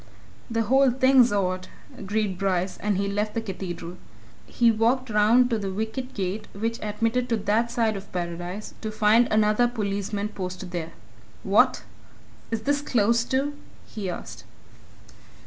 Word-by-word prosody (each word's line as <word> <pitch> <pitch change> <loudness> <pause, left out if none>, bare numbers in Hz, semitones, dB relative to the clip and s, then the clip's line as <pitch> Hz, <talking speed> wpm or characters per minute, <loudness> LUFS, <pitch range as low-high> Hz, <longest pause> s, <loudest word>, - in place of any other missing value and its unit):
"The 230 0 0
whole 265 +4 +4
thing's 260 -1 +5
odd," 185 -2 -1 0.3
agreed 205 -2 -2
Bryce, 185 -1 0
and 205 -2 -1
left 210 +2 -1
the - - +1
Cathedral. 180 -4 -6 0.5
He 235 -1 +3
walked 235 +3 +1
round 225 +4 +4
to 225 - +1
the 195 -2 -3
wicket 220 +6 -4
gate 195 +2 -3
which 225 +3 -3
admitted 230 +4 -1
to 230 - +2
that 215 +3 +1
side 230 -3 +1
of 195 0 -8
Paradise 175 +3 -5
to 220 - -3
find 215 +2 +4
another 215 +2 +3
policeman 205 -2 -2
posted 185 -2 -6
there. 165 -2 -4 0.5
"What! - - +3 0.7
is 225 -1 -2
this 285 +4 0
closed, 235 -3 +1
too?" 275 +3 0 0.3
he 200 -4 -5
asked. 175 - -7
215 Hz, 145 wpm, -25 LUFS, 195-235 Hz, 0.7 s, thing's